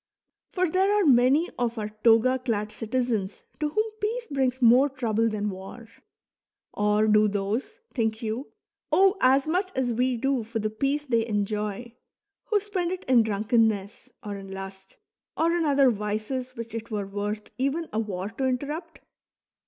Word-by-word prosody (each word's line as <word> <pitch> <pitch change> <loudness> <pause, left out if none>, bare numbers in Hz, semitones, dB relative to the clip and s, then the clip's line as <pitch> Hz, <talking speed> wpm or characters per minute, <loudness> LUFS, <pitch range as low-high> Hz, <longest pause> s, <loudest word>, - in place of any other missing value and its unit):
For 365 -1 0
there 375 +4 +2
are 415 -1 +3
manv 270 +5 +4
of 240 -1 -1
our 210 -1 -3
toga 235 +3 +5
clad 215 -4 -2
citizens 225 -4 -2 0.2
to 300 -1 0
whom 430 +8 +1 0.2
peace 460 +3 -1
brings 260 -2 0
more 250 +3 +6
trouble 230 -4 0
than 210 -1 -2
war. 195 +5 -10 0.9
Or 210 +1 +2
do 215 0 +5
those, 205 - -2 0.2
think 220 -3 0
vou, 225 +4 -4 0.4
owe 390 +1 +5
as 265 +2 +4
much 365 +4 0
as 250 -2 0
we 250 +1 +1
do 270 +1 0
for 225 +1 -5
the 215 -1 -1
peace 275 +6 -1
thev 230 -4 +1
enjov, 210 +2 -2 0.5
who 425 -2 +2
spend 380 -4 -2
it 370 0 -4
in 255 -2 +5
drunkenness, 215 -1 0
or 205 -2 -5
in 195 -1 -10
lust, 195 0 -9 0.4
or 335 +1 +2
in 340 -2 +1
other 275 -3 +4
Wees 215 +5 -3
which 230 -2 -7
it 230 0 -5
were 210 -3 -2
worth 205 +2 -4
even 285 +5 0
a 215 - 0
war 200 -3 -3
to 265 +4 -3
interrupt 295 +6 -4
235 Hz, 165 wpm, -26 LUFS, 210-275 Hz, 0.9 s, more